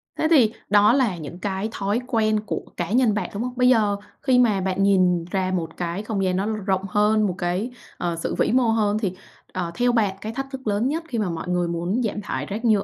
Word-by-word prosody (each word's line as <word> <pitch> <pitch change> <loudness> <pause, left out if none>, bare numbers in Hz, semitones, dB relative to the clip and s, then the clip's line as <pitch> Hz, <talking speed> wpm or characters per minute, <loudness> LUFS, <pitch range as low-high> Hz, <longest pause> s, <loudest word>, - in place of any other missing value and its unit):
Thế 315 - +1
thì 235 -8 +5 0.2
đó 205 +2 +5
là 240 -10 +2
những 165 +3 -8
cái 200 +2 -2
thói 205 +4 -1
quen 215 -3 +2
của - - -3 0.2
cá - - -3
nhân 240 -3 +3
bạn, 210 - -2
đúng 210 +4 -3
hông? 250 0 -4
Bây 250 0 +5
giờ 210 -4 +3 0.2
khi 260 -3 +3
mà 210 -6 +3
bạn 190 +1 0
nhìn 180 -4 +3
ra 185 -1 0
một 165 -3 -3
cái 175 +3 -3
không 210 -3 -2
gian 185 -1 +1
nó 195 +2 0
rộng 195 -3 -1
hơn, 210 +1 +3
một 180 - -3
cái, 185 +7 -1 0.3
ờ, 170 -1 -2
sự 165 - -3
vĩ - - +1
mô 255 0 +4
hơn 210 -2 +1
thì, 195 -5 -1 0.4
ờ, 175 -2 -3
theo 245 0 +2
bạn 210 -5 +1
cái 220 +1 -5
thách 270 +1 -4
thức 265 -4 -7
lớn 210 +4 +1
nhất 320 +4 -2
khi 235 -6 -3
mà 200 -4 0
mọi 165 +1 -5
người 175 -1 +1
muốn 175 +8 -1
giảm 210 -1 -2
thải - - -4
rác 220 +4 -5
nhựa 210 -3 +4
205 Hz, 250 wpm, -23 LUFS, 185-225 Hz, 0.4 s, thì